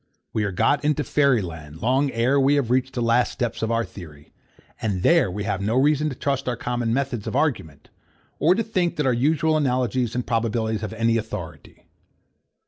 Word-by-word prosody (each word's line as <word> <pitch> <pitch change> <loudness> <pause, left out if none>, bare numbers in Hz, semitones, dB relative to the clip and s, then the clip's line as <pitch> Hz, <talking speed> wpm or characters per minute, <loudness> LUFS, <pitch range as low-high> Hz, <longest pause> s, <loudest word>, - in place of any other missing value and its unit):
We 110 - 0
are 100 - -2
got 140 +10 +1
into 150 0 +1
fairy 140 -8 +2
land, 80 -3 -9
long 130 +6 +1
ere 130 +3 +1
we 135 +2 +4
have 135 -5 0
reached 130 +1 0
the 120 - -1
last 115 +1 +2
steps 120 -3 -3
of 110 - -1
our 115 0 +1
theory; 80 -6 -13 0.5
and 95 -5 -2
there 170 - +4
we 100 +3 -4
have 100 -2 -2
no 105 +4 0
reason 150 +3 +3
to 130 - -6
trust 135 0 -2
our 125 - -1
common 120 -1 -2
methods 125 -4 -2
of - - -3
argument, 125 - -2 0.5
or 165 +6 +4
to 230 - 0
think 185 -6 -1
that 150 - -1
our 130 - +3
usual 155 +5 +2
analogies 125 -4 0
and 125 - -2
probabilities 110 -1 -1
have 110 0 -5
any 115 +1 +1
authority. 110 0 -7
120 Hz, 200 wpm, -23 LUFS, 110-140 Hz, 0.5 s, we